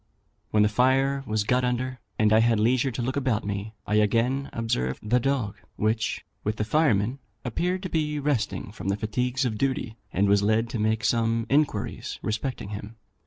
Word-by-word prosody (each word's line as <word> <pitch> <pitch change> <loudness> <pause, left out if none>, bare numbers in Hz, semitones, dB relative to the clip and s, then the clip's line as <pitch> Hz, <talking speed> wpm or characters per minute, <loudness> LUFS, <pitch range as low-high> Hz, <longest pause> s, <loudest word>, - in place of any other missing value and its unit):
When 105 -1 +4
the - - +5
fire 135 +5 +2
was 110 -1 +1
got 125 +4 +2
under, 125 +1 -1 0.2
and 110 0 +4
I 110 - +6
had 115 -1 +3
leisure 125 +4 +3
to 120 -1 -3
look 130 +2 -1
about 130 -7 0
me, 100 +2 -4
I 105 - +1
again 115 +6 +2
observed 105 - -2
the 125 +3 +4
dog, 125 -6 -1 0.2
which, 110 +1 -1 0.2
with 105 +1 -1
the 105 - -1
firemen, 125 -3 +2 0.3
appeared 180 - -1
to 185 - -3
be 150 -2 0
resting 140 -8 -1
from 105 -2 -7
the 100 +1 +1
fatigues 125 +5 -1
of 110 -4 -2
duty, 130 -5 -1
and 100 +3 +2
was 100 0 +4
led 110 +3 +2
to 120 -2 -3
make 110 0 +1
some 115 0 +2
inquiries 140 -8 0
respecting 110 0 -3
him. 105 +1 -7
115 Hz, 185 wpm, -26 LUFS, 105-130 Hz, 0.3 s, I